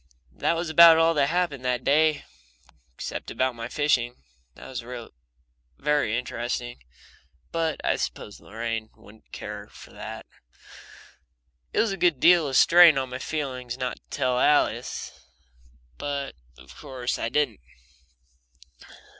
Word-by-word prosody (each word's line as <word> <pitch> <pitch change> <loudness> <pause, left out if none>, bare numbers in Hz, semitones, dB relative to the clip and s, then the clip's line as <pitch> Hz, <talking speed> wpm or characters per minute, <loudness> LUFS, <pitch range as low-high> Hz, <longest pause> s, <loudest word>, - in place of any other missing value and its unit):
That 170 - 0
was 170 +1 -2
about 165 +1 +8
all 165 0 +4
that 140 -3 +2
happened 170 -6 -1
that 125 -1 -1
day 155 +1 +2 0.7
except - - -6
about 130 0 0
my 115 -1 -6
fishing. 125 -4 0 0.4
There - - -12
was 130 -2 -5
a 120 -1 -9 0.7
very 145 -6 +1
interesting 120 - -4 0.7
but 165 -2 -1
I - - +1
suppose 105 - -5
Lorraine 115 0 -4
wouldn't 110 +2 -19
care - - -7
for - - -15
that. - - -8 1.5
It - - -1
was 225 - 0
a 195 - -3
good 170 -8 +2
deal 170 -1 +5
of - - -2
a - - -6
strain 170 -2 +7
on 130 -1 -2
my 130 - -5
feelings 130 -5 -4
not 125 -1 -3
to - - -23
tell 125 -1 0
Alice, 150 +3 +1 0.9
but 140 -1 -4 0.2
of 65 +1 -15
course 125 -2 -4
I 115 - -2
didn't. 135 -5 0
130 Hz, 140 wpm, -25 LUFS, 120-155 Hz, 1.5 s, about